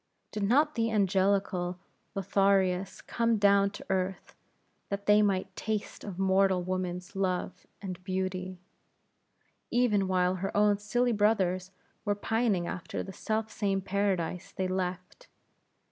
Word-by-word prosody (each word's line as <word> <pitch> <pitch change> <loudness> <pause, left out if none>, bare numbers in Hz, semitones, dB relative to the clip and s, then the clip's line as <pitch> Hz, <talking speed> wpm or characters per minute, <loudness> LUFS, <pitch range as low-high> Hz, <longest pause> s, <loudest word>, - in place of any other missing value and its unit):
Did 210 - -4
not 285 +9 +3
the 230 -3 0
angelical 195 -3 +1 0.4
Lotharios 195 -1 +1
come 230 -1 +1
down 200 -1 +4
to 200 - -10
earth, 185 -1 -2 0.5
that 200 0 -3
they 210 0 +6
might 190 -2 0
taste 215 -2 -3
of 195 -4 -7
mortal 190 -1 +3
woman's 180 +1 -3
Love 185 -2 -2 0.2
and 185 -2 -6
Beauty? 185 0 -3 1.1
even 220 -5 +2
while 185 0 +2
her 195 +2 -3
own 205 -1 +4
silly 240 +4 +1
brothers 195 -4 +1 0.3
were 205 - 0
pining 215 -3 0
after 180 - -4
the 190 - -8
self 220 +2 -2
same 195 -3 0
Paradise 190 -2 -1
they 185 - -2
left? 185 - -4
195 Hz, 130 wpm, -29 LUFS, 185-205 Hz, 1.1 s, they